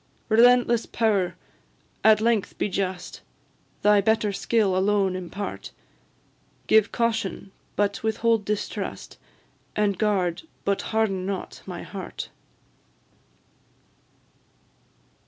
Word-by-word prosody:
Relentless 240 +1 +5
power! 205 -6 +1 0.7
at 220 -1 +6
length 225 -2 0
be - - 0
just, 185 -1 -3 0.6
Thy 210 -1 +5
better 215 0 +1
skill 205 -2 +1
alone 195 0 +2
impart; 185 +2 -6 1.0
Give 220 -1 +4
Caution, 225 -4 -1 0.2
but 200 -1 0
withhold 220 0 +1
Distrust, 210 0 -4 0.6
And 205 -3 +1
guard, 190 -5 +1 0.2
but 200 0 +1
harden 200 -4 0
not, 195 -2 -5
my - - -6
heart! - - -7
205 Hz, 90 wpm, -25 LUFS, 195-220 Hz, 1.0 s, at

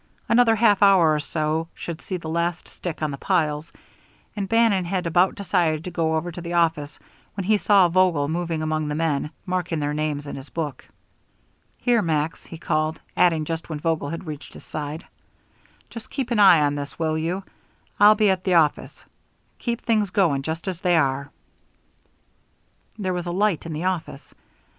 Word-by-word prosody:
Another 230 -1 +4
half 210 -2 +3
hour 190 -6 +6
or 150 - 0
so 155 +2 -2
should 170 -1 -6
see 185 - -4
the 170 - -8
last 170 +1 -2
stick 165 -3 -6
on 150 - 0
the 140 - -7
piles, 155 -4 0 0.6
and 200 -3 -3
Bannon 225 -5 +3
had 180 +1 -2
about 175 +3 +3
decided 175 -6 0
to 180 - -6
go 160 -2 0
over 165 +2 -2
to 175 - -8
the 170 0 -5
office 160 -4 0 0.4
when 195 - -3
he 215 +3 +3
saw 200 -3 +4
Vogel 170 -5 +2
moving 165 0 -2
among 155 -1 -1
the 150 - -2
men, 150 -2 0 0.2
marking 180 -3 -2
their 145 -1 -1
time 150 -1 -1
in 145 - -6
his 135 +1 -9
book. 150 -5 -5 0.9
"Here, 240 -2 +2
Max," 160 -3 -1
he 165 - -9
called, 155 0 -1 0.2
adding, 165 -4 +3 0.2
when 155 -2 -5
Vogel 160 -2 -1
had 165 +3 -6
reached 150 -2 -8
his - - -12
side: 155 +1 -6 0.8
"Just 230 - -10
keep 255 -3 -4
an 230 - +1
eye 185 -6 +7
on 145 -1 +2
this, 145 -1 -6
will 160 -1 0
you? 170 +5 -2 0.6
I'll 210 +1 +8
be 210 -2 +3
at 185 -1 -2
the 185 -2 +2
office. 155 -3 +1 0.5
Keep 235 -1 -3
things 215 -4 +1
going 170 -8 +2
just 160 +5 -5
as 185 -2 -4
they 175 -2 +3
are." 140 -1 0 1.7
There 190 -3 -2
was 175 0 -4
a - - -2
light 190 -3 0
in 165 - -5
the 155 +3 -4
office. 175 -6 -4
170 Hz, 185 wpm, -23 LUFS, 155-185 Hz, 1.7 s, I'll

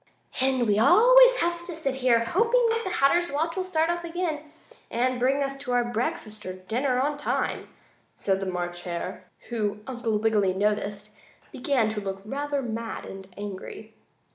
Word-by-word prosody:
"And 260 -2 +2
we 205 0 +3
always - - +7
have 340 0 0
to 345 -2 -5
sit 275 -5 -1
here, 250 -3 +3
hoping 465 - +3 0.2
the 375 - -3
Hatter's 345 +1 +2
watch 320 +4 -1
will 375 - -1
start 330 -2 +1
off 345 0 -3
again, 335 -3 -2 0.5
and 250 +1 0
bring 270 +3 +2
us 275 0 -2
to 250 -3 0
breakfast 215 -2 -3
or 185 - -5
dinner 245 +8 -1
on 290 +2 0
time," - - -2 0.5
said 195 -1 0
the 195 - -4
March 175 -1 -3
Hare, 175 +1 -5 0.2
who, 210 -3 -2
Uncle 240 -4 -2
Wiggily 210 -3 +2
noticed, 210 +1 -1 0.4
began 250 -3 +1
to 215 -1 -3
look 195 -1 -5
rather 285 +3 -2
mad 230 -1 -5
and 195 0 -9
angry. 205 +2 -8
250 Hz, 165 wpm, -26 LUFS, 210-305 Hz, 0.5 s, always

